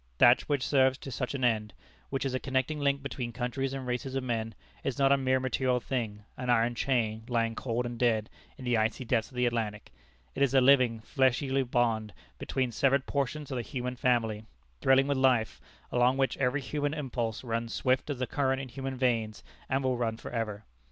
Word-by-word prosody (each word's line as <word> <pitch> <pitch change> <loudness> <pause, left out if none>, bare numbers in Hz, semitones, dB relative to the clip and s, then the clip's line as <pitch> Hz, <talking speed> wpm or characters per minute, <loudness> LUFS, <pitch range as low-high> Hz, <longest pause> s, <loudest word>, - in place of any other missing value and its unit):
That 120 - +7
which 140 -3 +1
serves 130 -2 +3
to 135 - -8
such 125 +2 -3
an 130 - -3
end; 110 -3 +1 0.4
which 135 0 -2
is 135 - -1
a 130 - 0
connecting 130 +3 -1
link 140 -1 +1
between 125 -3 -4
countries 130 +2 -2
and 135 -1 -5
races 125 +2 -3
of 135 - -1
men; 115 -3 -2 0.3
is 135 -3 -2
not 135 -1 +4
a - - +7
mere 130 -1 +1
material 130 -1 +1
thing, 115 -5 -3
an 125 0 -4
iron 120 0 +3
chain, 115 -4 0
lying 115 -2 0
cold 120 +1 -2
and 120 -1 -5
dead 110 -3 +2 0.3
in 130 - -9
the 120 -2 +2
icy 110 +4 0
depths 115 -1 0
of 130 - -16
the 125 0 +2
Atlantic. 110 -3 -2 0.4
It - - -5
is 135 -1 +3
a - - +8
living, 125 -4 +4
fleshly 135 +2 +1
bond 115 -4 0 0.3
between 130 -2 -1
severed 135 +3 +2
portions 145 +1 -2
of 130 - -2
the - - -1
human 125 +1 -4
family, 115 -4 0 0.3
thrilling 135 0 +5
with 140 -1 0
life, 125 -5 +2 0.3
along 125 +2 +3
which 135 -1 +1
every 135 +2 +1
human 145 +2 -2
impulse 120 -6 -3
runs 115 -1 -2
swift 130 +2 0
as 145 - -2
the 130 - -1
current 135 0 0
in 135 -1 -6
human 135 +1 -5
veins, 115 -4 0 0.3
and 135 +1 +1
will 130 -1 +1
run 115 -2 -1
for - - -8
ever. 110 -3 -3
125 Hz, 205 wpm, -30 LUFS, 115-135 Hz, 0.4 s, a